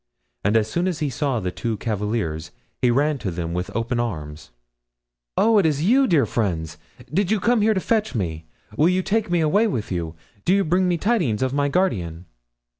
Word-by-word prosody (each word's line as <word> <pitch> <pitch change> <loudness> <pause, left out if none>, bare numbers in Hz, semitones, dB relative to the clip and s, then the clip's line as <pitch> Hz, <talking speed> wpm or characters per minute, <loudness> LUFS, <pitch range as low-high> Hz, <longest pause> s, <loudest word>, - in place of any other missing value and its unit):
And 105 +3 +3
as 110 -1 +1
soon 170 +10 -1
as 180 -4 -1
he 150 -2 -2
saw 135 -1 -1
the 90 -3 -3
two 115 +3 -3
cavaliers 105 -8 -2 0.3
he 125 - +4
ran 140 +4 +2
to 105 - -3
them 85 -1 -4
with 90 +1 -3
open 115 +1 -1
arms. 75 - -4 0.9
"Oh, 220 0 +5
is 155 -7 +2
it - - -2
you, 260 +8 +4
dear 160 -6 +3
friends? 80 -8 -2 0.3
Did 190 +2 +1
you 215 0 +2
come 235 +3 +2
here 215 +1 +3
to - - +2
fetch 215 - 0
me? 80 -6 -3 0.3
Will 155 +8 +4
you 185 0 +1
take 215 0 0
me 175 -1 +2
away 200 +9 +3
with 115 - -3
you? 85 -2 -3 0.3
Do 185 - +3
you 200 - +3
bring 180 +3 +2
me 175 -1 +1
tidings 165 - +1
of 130 0 -1
my 145 0 +1
guardian?" 90 - -1
135 Hz, 205 wpm, -23 LUFS, -, 0.9 s, Oh